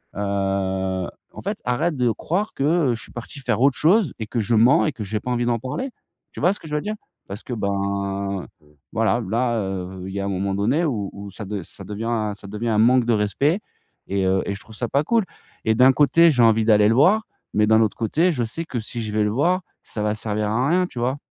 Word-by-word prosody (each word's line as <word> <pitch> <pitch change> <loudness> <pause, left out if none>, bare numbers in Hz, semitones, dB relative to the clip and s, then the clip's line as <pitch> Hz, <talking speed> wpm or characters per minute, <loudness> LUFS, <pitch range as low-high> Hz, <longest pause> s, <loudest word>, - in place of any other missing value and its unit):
heu, 95 -2 -1 0.3
en - - -9
fait, - - -3
arrête 125 +7 0
de 125 -2 +2
croire 190 - -2
que, - - -3 0.3
heu, - - 0
je 110 - -8
suis - - -12
parti 120 +4 -8
faire 130 -2 -1
autre 135 0 +4
chose 180 - +3
et 110 - -4
que 120 - -2
je 115 +2 +1
mens 115 +5 +5
et 155 - +1
que 125 -6 -7
j'ai 105 +2 -2
pas 125 - -4
envie 120 0 0
d'en 120 -1 +1
parler». 130 - -4 0.4
Tu - - -7
vois 180 - +4
ce - - -7
que 160 - -11
je 150 - -3
veux 150 - 0
dire? 215 +1 -3 0.3
Parce 100 +3 -6
que 125 - -6
ben, 100 -2 -2 0.2
heu, - - -26 0.3
voilà, 115 +2 +1
là, 120 +2 +1
heu, 95 -1 -5
il 95 - -7
y 100 - -3
a 100 - -2
un - - -2
moment 100 0 -1
donné 115 - +1
où 105 -10 -2
où 100 0 -9
ça 105 - -8
de 100 -1 -4
ça 95 - -12
devient 110 +1 -2
ça 100 - -15
devient 105 +4 -4
un 110 - +1
manque 120 +2 +4
de 120 - +2
respect 135 - +1 0.5
et 95 -1 0
heu 95 0 +2
et 100 - -2
je 100 - -7
trouve 110 +1 -13
ça 120 - -2
pas 140 +2 +2
cool. 230 +5 +2 0.4
Et 110 - +3
d'un 130 +3 +7
côté, 165 +4 +5
j'ai 125 -4 +3
envie 110 -1 +4
d'aller 105 -2 +5
le - - +4
voir, 190 - +5 0.3
mais 105 0 +4
d'un 110 +1 +5
autre 110 - 0
côté, 160 +11 +2
je 125 -5 -1
sais 120 +9 -4
que, 125 -6 -4
si 115 +2 -5
je 110 -1 -4
vais 105 0 +2
le 105 - +1
voir, 175 - +2 0.2
ça 105 - -6
va 105 - +1
servir 105 -1 -2
à 125 +6 +1
rien, 180 +2 +3
tu 125 - -8
vois? 130 +4 0
115 Hz, 260 wpm, -22 LUFS, 100-130 Hz, 0.5 s, d'un